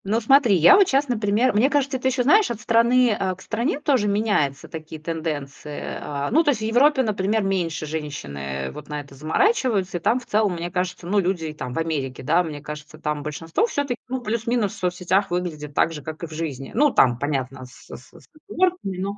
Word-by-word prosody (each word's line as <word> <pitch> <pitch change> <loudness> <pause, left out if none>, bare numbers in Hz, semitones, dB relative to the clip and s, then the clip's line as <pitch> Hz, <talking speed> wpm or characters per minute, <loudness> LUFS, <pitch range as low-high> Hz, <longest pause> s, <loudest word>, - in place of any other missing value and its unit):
Ну, 215 +4 +1
смотри, 240 -2 +4
я 175 - +7
вот 395 -2 +5
щас, 275 +2 +2
например 220 +1 +1
мне 225 +6 +3
кажется, 280 -2 0
это 255 - -2
ещё, 260 -1 +1
знаешь, 405 - +4
от 235 -3 -4
страны, 235 +2 +3
а, 190 -1 -1
к 185 - -17
стране 240 +6 -2
тоже 270 -8 +1
меняются 200 -10 0
такие 160 0 -8
тенденции. 150 -3 -5 0.2
А, 145 -1 -4
ну, 320 +7 +4
то 305 - +2
есть, 230 -6 -3
в - - -3
Европе, 265 +5 +4
например, 210 0 0
меньше 175 -5 -1
женщины 70 - -5
вот - - -10
на 150 0 -3
это 140 -1 -15
заморачиваются. 195 - +1
И - - -6
там, 235 +9 +1
в 250 - -15
целом, 210 -2 +1
мне 170 +1 -5
кажется, 180 -1 -3
ну, 200 +4 +1
люди 175 -4 -1
там, 125 -5 -6
в - - -6
Америке, 145 -6 -3
да, 165 +6 +3
мне 155 -4 -6
кажется, 150 +1 -9
там 150 -1 -3
большинство, 160 - -1
всё-таки, 280 - -2
ну, 255 0 -3
плюс-минус 230 -2 -1
в - - -11
соцсетях 180 +2 0
выглядит 160 -5 -4
так 165 - +2
же, 150 - -7
как 155 +3 -8
и - - -3
в - - -17
жизни. 145 -4 -5
Ну, 290 +5 +4
там, 120 - +3
понятно, 135 -2 -3
с 125 - -16
с 125 - -14
с - - -17 0.2
оговорками, 355 - 0
но 200 +2 -3
185 Hz, 215 wpm, -23 LUFS, 150-235 Hz, 0.2 s, я